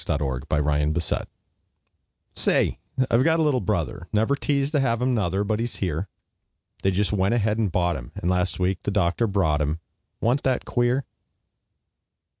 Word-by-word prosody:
HIS - - -7
NEW 65 -3 -1
BROTHER 75 +2 0 1.1
Say, - - +2 0.3
I've 115 +2 +4
got 165 +2 +3
a 160 - +2
little 145 -4 +2
brother, 90 -1 -2
Never 110 +5 +2
teased 140 0 0
to 150 - +2
have 115 -4 +1
him, 125 +1 +1
nuther, 100 -3 0
But 105 +1 -1
he's 120 +1 -2
here; 90 0 -2 0.7
They 95 - +2
just 95 0 0
went 100 +2 +2
ahead 110 -1 +1
and 105 -5 +1
bought 85 -1 +1
him, - - -9
And, - - -4
last 90 -1 +1
week 95 0 0
the - - -2
doctor 100 +3 +1
brought 80 -7 +1
him, 75 +2 -1 0.4
Wa'n't 125 +5 +1
that 130 -2 0
queer? 120 +3 +1
100 Hz, 170 wpm, -24 LUFS, 85-120 Hz, 1.1 s, I've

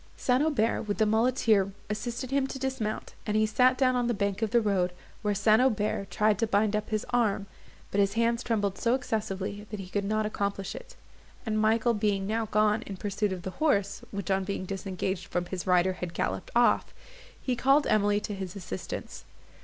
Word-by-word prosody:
St. 250 +1 +2
Aubert, 275 -8 +1
with 205 - -1
the 220 - +3
muleteer, 220 -3 +3 0.2
assisted 240 +4 -4
him 275 -1 +2
to 270 - -6
dismount, 260 -5 -3
and 210 0 +1
he 215 - +4
sat 250 +4 +3
down 255 -2 +3
on 245 -1 +1
the 240 - 0
bank 200 +1 -1
of 220 - +1
the 235 - +4
road, 190 -5 +1 0.3
where 205 -1 0
St. 215 +3 +4
Aubert 210 -5 +1
tried 210 0 +2
to 225 - +2
bind 210 0 +2
up 210 0 -2
his 215 -1 -1
arm, 220 -5 +1 0.5
but 200 - 0
his 200 0 +3
hands 230 +1 +1
trembled 205 -5 -1
so 235 +1 +2
excessively 205 -4 -3
that 210 - -5
he 190 - -7
could 205 +1 -1
not 215 +2 0
accomplish 200 -2 -2
it; - - -10 0.5
and, 215 -1 0
Michael 225 +2 +3
being 205 -2 0
now 220 +2 -1
gone 215 +1 +2
in 195 - -6
pursuit 205 +1 -1
of 180 -2 -5
the 190 - -4
horse, 200 -10 +1
which, 200 -2 -4
on 190 0 +2
being 190 -1 -3
disengaged 190 -1 -3
from 175 0 -2
his 180 +1 -5
rider, 180 +1 +4
had 180 -2 -6
galloped - - -2
off, 240 0 +3 0.4
he 255 - -1
called 270 +4 +4
Emily 205 -1 +3
to 210 - -4
his 190 -2 -6
assistance. 165 - -6
210 Hz, 200 wpm, -28 LUFS, 195-230 Hz, 0.5 s, he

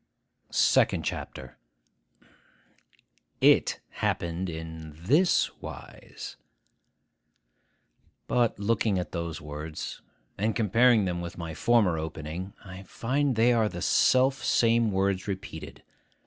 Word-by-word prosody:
SECOND - - +3
CHAPTER 65 -2 -6 1.8
IT - - +4
happened 85 +2 -2
in 80 -1 -7
this 145 - +2
wise— - - -9 1.9
But, 120 -2 +1
looking 105 0 +1
at 90 - -3
those 85 -2 -4
words, 75 +1 -6 0.4
and 110 +2 0
comparing 115 0 +4
them 90 -1 -2
with 85 0 -7
my 85 -2 -5
former 100 -4 +2
opening, 80 +4 -6
I 95 0 -9
find 130 +7 -1
they 115 +2 +4
are 110 -2 +2
the 85 -3 -6
self 130 +1 +3
same 115 -1 +3
words 95 +1 0
repeated. 95 -5 -7
95 Hz, 105 wpm, -27 LUFS, 80-115 Hz, 1.9 s, IT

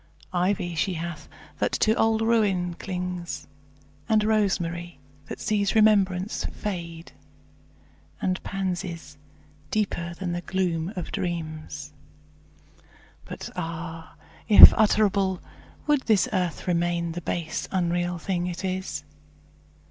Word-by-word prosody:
Ivy 180 -1 0
she 180 +3 0
hath, 165 -2 -6 0.3
that - - 0
to 215 - +3
old 225 -1 +2
ruin 200 -6 +2
clings; 180 -1 -5 0.6
And 215 -1 +4
rosemary, 175 -5 0 0.3
that - - -7
sees 205 -1 0
remembrance 200 -3 +3
fade; 170 -4 -5 1.1
And 185 0 -1
pansies, 175 -6 -4 0.5
deeper 170 -5 -1
than 180 -1 -4
the 175 0 -2
gloom 175 -2 -1
of 180 -3 -5
dreams; 155 -4 -4 1.3
But - - -7
ah! 165 -1 -6 0.3
if 210 - +12
utterable, 200 -4 +2 0.5
would 295 -2 +3
this 215 -4 +4
earth 180 -4 -1
Remain 170 -1 0
the 175 +2 -5
base, 165 -1 -3
unreal 175 -1 0
thing 175 +1 -2
it 180 +2 -4
is? 185 - -3
180 Hz, 110 wpm, -26 LUFS, 170-195 Hz, 1.3 s, if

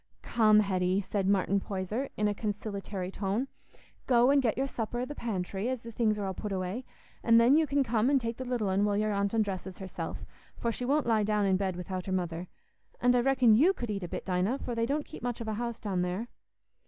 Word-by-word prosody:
"Come, 215 -2 +5
Hetty," 185 -1 +1
said 195 0 -2
Martin 200 0 +2
Poyser, 200 +7 -3
in 210 - +2
a 205 - +1
conciliatory 200 -3 -4
tone, 200 +7 -1 0.6
"go 245 +1 +5
and 280 0 +5
get 235 -4 0
your 270 - +1
supper 240 -2 -3
i' - - -1
the 290 - -6
pantry, 200 -3 -3
as 255 -2 -3
the 230 - -8
things 215 -2 +1
are 205 - -2
all 190 - -2
put 210 +3 -5
away; 190 +6 -3 0.4
an' 230 -1 +5
then 235 +4 +6
you 315 0 +3
can 280 -1 +2
come 230 0 +1
and 280 -1 +4
take 230 -1 -4
the 260 - -4
little 245 -5 -1
un 190 +2 +2
while 205 -1 +1
your 215 0 +1
aunt 200 +2 0
undresses 195 -4 -2
herself, 190 -2 -6 0.3
for 235 - -1
she 245 - -4
won't 285 +2 +2
lie 225 -2 +3
down 210 0 +1
in 190 -1 +3
bed 190 -1 -1
without 185 +1 -5
her - - -2
mother. 175 -1 -2 0.5
An' 245 0 +4
I 250 - +4
reckon 255 -2 +4
you 310 - +5
could 240 - -4
eat 200 -1 -3
a 175 - -4
bit, - - -5
Dinah, 185 +7 0
for 245 - -5
they 230 0 0
don't 290 +2 -1
keep - - -10
much 245 -1 -3
of 230 - -5
a 220 - -1
house 235 +1 -3
down 190 -4 -1
there." 185 +7 -2
215 Hz, 240 wpm, -30 LUFS, 195-240 Hz, 0.6 s, then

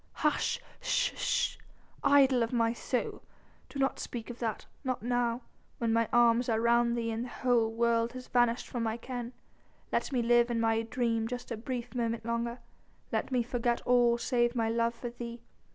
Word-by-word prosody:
"Hush 300 - 0 0.2
sh - - +1
sh, - - 0 0.5
idol 275 -3 +5
of 230 - 0
my 230 -2 +2
soul! 245 +1 -3 0.5
Do - - -8
not 270 0 +1
speak 240 0 -5
of 240 - -11
that... 225 -4 -3 0.2
not 255 -4 -2
now... 245 0 0 0.3
when 230 -1 0
my 230 -1 +2
arms 240 0 +4
are 220 -1 +2
round 235 +1 +3
thee 230 -1 -1
and 225 +1 -2
the 250 - -6
whole 240 -3 +2
world 230 0 +1
has 255 0 -8
vanished 240 0 +2
from 245 - -4
my 225 0 -1
ken. 245 0 -5 0.6
Let - - 0
me 250 -3 +1
live 240 +1 +4
in 235 -1 0
my 225 0 +2
dream 230 -1 -1
just 245 +1 -6
a - - -1
brief 245 +2 -5
moment 230 -2 -2
longer; 235 +1 -2 0.5
let - - -1
me 250 -2 +2
forget 240 0 0
all 240 -1 +4
save 240 0 +1
my 225 -2 +1
love 230 +1 +1
for 240 0 -6
thee. 235 0 -8
235 Hz, 185 wpm, -31 LUFS, 230-245 Hz, 0.6 s, idol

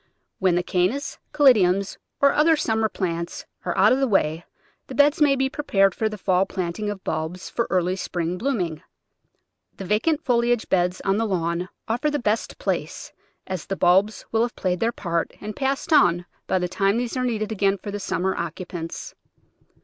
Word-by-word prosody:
When 185 -2 +3
the 175 - +1
Carinas, 190 - -1
Caladiums, 200 -9 +4 0.3
and 280 - +6
other 320 +2 +4
summer 220 -6 0
plants 170 -4 -4 0.2
are - - -2
out - - +6
of 260 - +1
the 270 - +2
way 165 -6 +1 0.4
the - - -8
beds 290 +2 +4
may 285 -2 +5
be 265 0 +1
prepared 195 -9 +2
for 220 - -1
the 215 - -7
fall 190 -1 +1
planting 185 +3 -3
of 205 -2 -6
bulbs 160 +4 -4
for 235 - -1
early 180 0 +1
spring 175 -1 -3
bloom 255 -3 0
ing. 160 -3 -4 0.9
The 195 - -6
vacant 285 - +1
foliage 240 -2 +2
beds 180 0 +1
on 195 0 +2
the 225 0 0
lawn 175 -1 -1 0.2
offer 245 +7 0
the 295 - 0
best 220 -3 -1
place, - - -3 0.3
as 185 -3 -5
the 195 - -2
bulbs 190 +5 +3
will 225 - +2
have 240 +1 -1
played 180 -2 -1
their 230 +4 +1
part 170 -7 -2
and 210 +1 -6
passed 275 +4 -1
on 175 - +4 0.2
by - - +2
the 180 -1 0
time 195 +3 +1
these 240 0 -2
are 255 - -1
needed 220 -3 -1
again 200 -2 +1
for 205 - -7
the 205 - -4
summer 190 0 -1
occupants. 170 0 -6
195 Hz, 190 wpm, -24 LUFS, 180-235 Hz, 0.9 s, and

